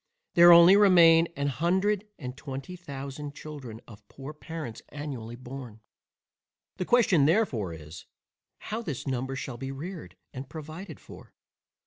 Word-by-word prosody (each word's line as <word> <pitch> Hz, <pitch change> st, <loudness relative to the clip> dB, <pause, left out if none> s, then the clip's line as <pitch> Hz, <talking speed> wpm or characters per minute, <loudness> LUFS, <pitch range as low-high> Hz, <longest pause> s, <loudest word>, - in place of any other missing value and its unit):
There 175 Hz, 0 st, +8 dB
only 170 Hz, +3 st, +9 dB
remain 170 Hz, -5 st, +6 dB
a 140 Hz, -, -1 dB
hundred 190 Hz, -, 0 dB
and 125 Hz, -4 st, -7 dB
twenty 135 Hz, +5 st, -7 dB
thousand 140 Hz, -3 st, -8 dB
children 135 Hz, -8 st, -9 dB
of 105 Hz, -2 st, -15 dB
poor 135 Hz, +2 st, -9 dB
parents 155 Hz, -6 st, -8 dB
annually 135 Hz, -6 st, -7 dB
born. 125 Hz, -3 st, -9 dB, 1.0 s
The 185 Hz, -, -3 dB
question 195 Hz, -, +4 dB
therefore 145 Hz, -, +1 dB
is, 80 Hz, +1 st, -12 dB, 0.5 s
How 220 Hz, +2 st, -5 dB
this 150 Hz, -, -5 dB
number 130 Hz, 0 st, -3 dB
shall 130 Hz, -2 st, -6 dB
be 135 Hz, +2 st, -5 dB
reared 140 Hz, -, -8 dB, 0.2 s
and 130 Hz, +1 st, -8 dB
provided 160 Hz, +2 st, -9 dB
for? -, -, -15 dB
145 Hz, 135 wpm, -27 LUFS, 130-170 Hz, 1.0 s, only